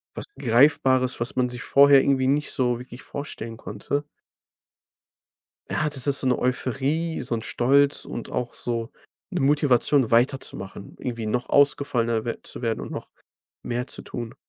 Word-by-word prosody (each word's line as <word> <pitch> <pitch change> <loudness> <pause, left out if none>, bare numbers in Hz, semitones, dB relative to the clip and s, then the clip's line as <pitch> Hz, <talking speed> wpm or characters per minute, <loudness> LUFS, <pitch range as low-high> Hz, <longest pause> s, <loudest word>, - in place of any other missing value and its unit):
was - - -4
Greifbares, 130 +1 +3
was 120 +2 -3
man 125 -1 +1
sich 125 0 -6
vorher 140 0 +6
irgendwie 130 -1 +2
nicht 145 +2 +1
so 125 -2 0
wirklich 125 0 -11
vorstellen 115 -5 -6
konnte 115 +7 -3 1.7
Ja, 155 - 0
das 140 -2 -4
ist 140 -1 +3
so 130 - -1
'ne 125 - +2
Euphorie, 135 +6 -1
so 120 - -2
'n 110 - -4
Stolz 140 +3 +2
und 120 - -7
auch 120 -1 -3
so 115 -1 -3 0.4
'ne - - -2
Motivation 135 -2 +3
weiterzumachen, 115 -5 -1
irgendwie 120 -3 -4
noch 125 +3 -2
ausgefallener 120 -5 +2
wer 115 - -4
zu - - -8
werden 115 -2 -1
und - - -7
noch - - -6 0.5
mehr 125 +1 -2
zu - - -6
tun. 120 -2 -7
125 Hz, 155 wpm, -24 LUFS, 120-140 Hz, 1.7 s, vorher